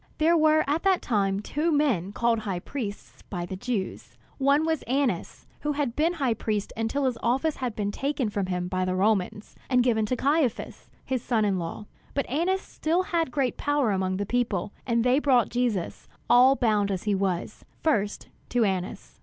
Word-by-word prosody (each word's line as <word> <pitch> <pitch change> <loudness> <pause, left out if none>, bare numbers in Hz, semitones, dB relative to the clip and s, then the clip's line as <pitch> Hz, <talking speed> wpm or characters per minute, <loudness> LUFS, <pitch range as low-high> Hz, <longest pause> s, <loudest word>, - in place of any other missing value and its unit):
There 325 +2 +4
were 310 -1 +4
at 295 +4 0
that 385 -2 +2
time 200 -4 +1
two 300 +9 -1
men 255 - +1
called 235 +1 +1
high 200 -4 -3
priests 210 -5 -6
by 175 -3 -3
the 190 - -6
Jews. 205 -1 -4 0.2
One 280 +3 +3
was 320 -2 0
Annas, 270 +1 -1
who 295 0 -1
had 280 -5 -2
been 320 +4 +2
high 270 -8 0
priest 215 -2 -3
until 225 +5 -1
his 250 -3 -1
office 270 +6 +1
had 250 -4 -3
been 205 -1 -1
taken 275 0 -1
from 200 -2 -1
him 180 -1 -2
by 185 0 -1
the 185 0 -1
Romans, 205 +1 0
and 250 -1 +4
given 220 -3 +2
to 255 - 0
Caiphas, 280 -2 -1 0.2
his 260 -2 -1
son 225 -3 +1
in 195 -3 +1
law. 170 +5 -5 0.3
But 280 - 0
Annas 360 +7 +1
still 340 +1 -1
had 335 -5 0
great 265 -1 -1
power 290 -6 +1
among 185 -1 0
the 205 - -2
people; 210 -5 -1 0.2
and 235 -1 +2
they 250 +3 +4
brought 260 -5 +3
Jesus, 235 -7 -2 0.2
all 255 +3 +6
bound 215 -5 +2
as 190 -2 -2
he 210 - +1
was, 190 -3 -2 0.2
first 210 -10 0 0.2
to 245 -2 +2
Annas. 185 -2 -4
240 Hz, 190 wpm, -26 LUFS, 200-285 Hz, 0.3 s, all